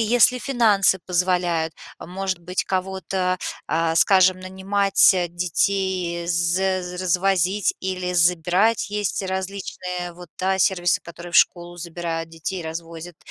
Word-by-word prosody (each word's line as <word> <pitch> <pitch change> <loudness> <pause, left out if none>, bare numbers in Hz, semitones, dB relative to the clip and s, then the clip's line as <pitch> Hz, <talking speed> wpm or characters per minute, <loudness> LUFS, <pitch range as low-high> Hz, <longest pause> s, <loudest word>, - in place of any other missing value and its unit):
если 240 +2 +4
финансы 215 -8 +2
позволяют, 175 -3 0 0.3
может 190 +1 -4
быть, 180 +2 -3
кого-то, 185 -1 -2 0.3
а, 165 0 0
скажем, 185 -1 +5
нанимать 190 +1 +2
детей, 180 0 -1
зе 175 +2 +1 0.2
развозить 185 +2 +1
или 185 -1 -3
забирать. 180 +6 +2
Есть 205 -1 -2
различные 185 -2 -5
вот, 175 0 -13
да, 190 +1 0
сервисы, 175 -2 +2
которые 170 +1 -10
в - - +3
школу 175 0 +2
забирают, 165 -1 -5
детей 165 +2 -5
развозят, 165 +1 -8
180 Hz, 115 wpm, -22 LUFS, 175-190 Hz, 0.3 s, скажем